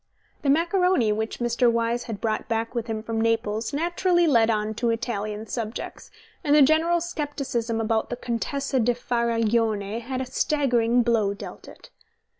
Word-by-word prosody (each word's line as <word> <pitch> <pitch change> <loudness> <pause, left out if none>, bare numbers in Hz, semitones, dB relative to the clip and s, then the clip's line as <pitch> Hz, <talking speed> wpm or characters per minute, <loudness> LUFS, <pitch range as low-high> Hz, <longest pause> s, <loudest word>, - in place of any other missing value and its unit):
The 280 - 0
macaroni 340 - +3
which 220 +1 -2
Mr. 240 0 +2
Wyse 235 +1 0
had 225 -4 -5
brought 220 -2 -2
back 225 0 -2
with 235 -1 -3
him 220 -1 -3
from 225 0 -2
Naples 225 0 0
naturally 345 +3 +1
led 230 -7 +4
on 215 -1 0
to 235 +2 -1
Italian 215 -2 -3
subjects, 225 -1 -6 0.3
and 295 -2 +3
the 300 - +8
general 320 +4 +3
scepticism 280 -8 -3
about 225 0 0
the - - -2
Contessa 260 +3 -2
di 240 +1 +2
Faraglione 230 -3 0
had 255 +2 -4
a 260 - -2
staggering 245 -3 +1
blow 220 -4 +1
dealt - - -10
it. - - -14
235 Hz, 160 wpm, -25 LUFS, 225-275 Hz, 0.3 s, the